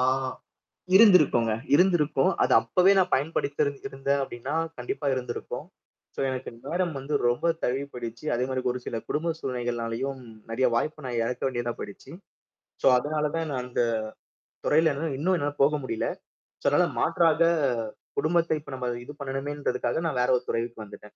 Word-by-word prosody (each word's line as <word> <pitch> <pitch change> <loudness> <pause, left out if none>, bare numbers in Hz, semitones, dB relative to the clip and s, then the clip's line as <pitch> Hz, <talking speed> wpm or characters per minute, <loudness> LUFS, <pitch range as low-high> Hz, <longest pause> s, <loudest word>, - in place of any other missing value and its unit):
ஆ. 125 - +3 0.9
இருந்திருக்குங்க. 170 - +6 0.2
இருந்திருக்கும். 155 -5 +4
அது - - +3
அப்பவே 180 - +4
நான் 185 -1 +3
பயன்படுத்திரு 145 0 0 0.2
இருந்தேன் 140 -4 -1
அப்படின்னா 130 +2 -5 0.2
கண்டிப்பா 125 +4 -4
இருந்திருக்கும். 125 +1 -4 0.5
சோ - - -7
எனக்கு 130 0 -4 0.2
நேரம் 175 +3 0
வந்து 140 +3 -5
ரொம்ப 120 +8 +2
தழுவி 135 +3 0
போயிடுச்சி. 120 +2 -7
அதே 125 +2 0
மாரி 130 -1 -2
ஒரு 125 - -4
சில 115 - -3
குடும்ப 165 +2 0
சூழ்நிலைகள்னாலயும் 120 0 -3 0.3
நெறைய 125 +3 +2
வாய்ப்பு 150 +3 -2
நான் 120 -2 -2
எழக்க 125 +1 -3
வேண்டியதா 120 -2 -2
போய்டுச்சு. 100 +7 -9 0.7
சோ - - +1
அதனால 150 +2 -1
தான் 165 -1 -1
நான் 130 - -2
அந்த 125 -1 0 0.8
துறையில 160 +1 +4
என்னால 150 0 -3
இன்னும் 180 +4 +2
என்னால 145 -1 -2
போக 150 +2 +4
முடியல. 115 -3 -2 0.5
சோ - - -19
அதனால - - +3
மாற்றாக 165 -1 +3 0.8
குடும்பத்தை 165 0 +2
இப்ப 145 - -11
நம்ம 125 -1 -3 0.2
இது 145 - -8
பண்ணணுமேன்றதுக்காக 135 0 -2
நான் 130 -6 -1
வேற 125 - +1
ஒரு 125 - -6
துறைக்கு 115 -1 -2
வந்துட்டன். 105 0 -13
135 Hz, 155 wpm, -27 LUFS, 125-155 Hz, 0.9 s, இருந்திருக்குங்க